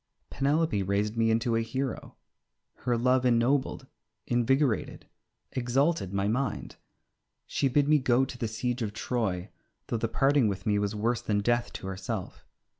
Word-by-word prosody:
Penelope 145 -3 +1
raised 100 +3 0
me 115 -1 +2
into 115 +1 +1
a 115 - +2
hero. 130 +3 -4 0.6
Her 120 -2 -1
love 125 +2 +3
ennobled, 125 +3 +2 0.4
invigorated, 125 +1 +1 0.5
exalted 130 - +1
my 100 0 0
mind. 130 +6 -2 0.7
She 140 - 0
bid 140 +2 +2
me 150 0 +5
go 130 0 +3
to 130 - -8
the 115 - -1
siege 125 +3 -2
of 105 -2 -2
Troy, 105 -6 -2 0.4
though 115 - 0
the 115 - -1
parting 135 -1 +3
with 100 0 -3
me 105 -2 +2
was 105 +1 -1
worse 115 +3 0
than 105 -1 0
death 120 +3 +1
to - - -7
herself. 95 +1 -5
120 Hz, 155 wpm, -28 LUFS, 105-130 Hz, 0.7 s, me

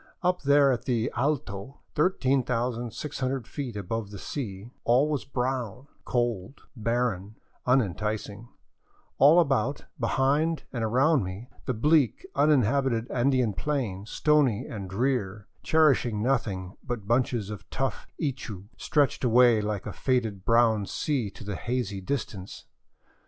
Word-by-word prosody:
Up 180 0 +1
there 140 -1 +5
at 125 -1 -2
the 115 -3 0
" - - -16
Alto," 135 -4 -2
13,600 130 - 0
feet 130 -6 -5
above 105 +2 -3
the 100 - -8
sea, 105 -2 -6
all 125 +5 +4
was 150 -3 -2
brown, 125 -2 -3 0.2
cold, 120 -1 -2
barren, 110 -3 -1 0.3
unenticing; 105 -2 0 0.7
all 150 +6 +7
about, 140 -3 +1
behind, 140 +7 +1
and 120 -3 -2
around 130 +4 +3
me 95 +7 -7 0.2
the 130 - 0
bleak, 150 - +2
uninhabited 135 -4 +2
Andean 125 -3 +2
plateau, 110 -7 -2
stony 135 -2 +2
and 100 -4 -6
drear, 105 -2 -1
cherish 155 -4 +4
ing 110 -3 -2
nothing 100 -8 -1
but 120 -6 -5
bunches 120 -3 +1
of 105 - -9
tough 135 0 -3
ichu, 120 - -4
stretched 145 -4 +1
away 120 -2 +5
like 105 -2 -3
a - - -5
faded 115 -7 -1
brown 115 -3 +3
sea 135 -9 -1
to 100 - -12
the 100 -1 -4
hazy 115 -4 -3
distance. 100 -4 -5
120 Hz, 130 wpm, -27 LUFS, 105-135 Hz, 0.7 s, all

